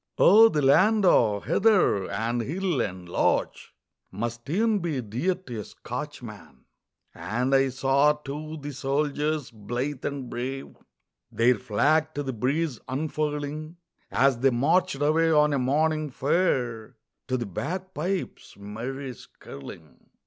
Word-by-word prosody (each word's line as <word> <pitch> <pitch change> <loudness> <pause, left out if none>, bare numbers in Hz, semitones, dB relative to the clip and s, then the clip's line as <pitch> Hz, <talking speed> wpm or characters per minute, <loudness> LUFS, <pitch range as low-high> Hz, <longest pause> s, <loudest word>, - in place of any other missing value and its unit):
Oh, 220 +4 +7
the 150 -8 0
land 195 +10 +4
o' 105 - +4
heather 190 - +2
and 120 +2 -1
hill 170 - -1
and 90 -3 -5
loch 85 - +1 0.6
Must 120 +5 -5
e'en 215 +5 +2
be 165 -6 -2
dear 125 - -1
to 125 -12 -8
a - - -4
Scotchman. - - -9 0.5
And 125 +5 -2
I 135 0 +4
saw, 135 +3 +3
too, 150 +2 -7
the 145 0 -6
soldiers 145 +1 -1
blithe 120 +6 -4
and 140 -3 -4
brave 130 +3 -5 0.6
Their 120 +2 +4
flag 155 +9 +1
to 145 - -2
the 135 -1 -4
breeze 135 +4 -1
unfurling, 150 +3 -3 0.3
As 135 -3 +2
they 135 +2 +4
marched 140 +8 +2
away 160 +2 +3
on 150 -1 +4
a 140 - +1
morning 155 +4 +1
fair 125 -6 -1 0.3
To 130 -1 0
the 120 - -3
bagpipes' 180 - -4
merry 125 +7 -6
skirling. 80 - -13
140 Hz, 130 wpm, -26 LUFS, 120-155 Hz, 0.6 s, Oh